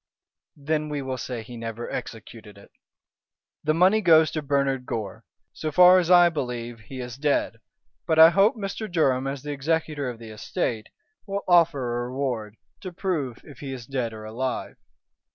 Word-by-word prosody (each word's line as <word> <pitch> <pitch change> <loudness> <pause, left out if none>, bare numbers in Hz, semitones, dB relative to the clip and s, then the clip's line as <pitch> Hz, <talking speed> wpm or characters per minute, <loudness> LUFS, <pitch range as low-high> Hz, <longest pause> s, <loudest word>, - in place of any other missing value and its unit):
"Then 150 +1 -2
we 145 -2 -3
will 130 -1 -4
say 120 -3 -5
he 120 +2 -10
never 115 0 -6
executed 110 -2 -8
it. 100 - -17 0.9
The 155 +1 +1
money 190 +6 +4
goes 160 -4 +5
to 155 - -3
Bernard 135 -2 0
Gore. 105 -4 -5 0.3
So 155 - -4
far 180 +4 +7
as 175 -1 -1
I 175 -1 +7
believe 125 -7 -4
he 130 +4 -10
is 125 0 -7
dead, 140 -5 0 0.5
but 160 - +1
I 160 +1 +9
hope 195 +6 +4
Mr. 210 0 -5
Durham, 135 -6 +1
as 135 0 -5
the 150 - -5
executor 150 -1 -1
of 120 - -7
the 115 -1 -11
estate, 110 +1 -3 0.4
will 200 0 -3
offer 145 -9 +3
a 120 0 -4
reward 125 -5 -3 0.2
to 185 - -7
prove 160 - -3
if 145 -4 -14
he 140 -2 -6
is 125 -3 -8
dead 125 -3 -3
or 110 -1 -9
alive. 125 +4 -4
135 Hz, 175 wpm, -25 LUFS, 120-160 Hz, 0.9 s, I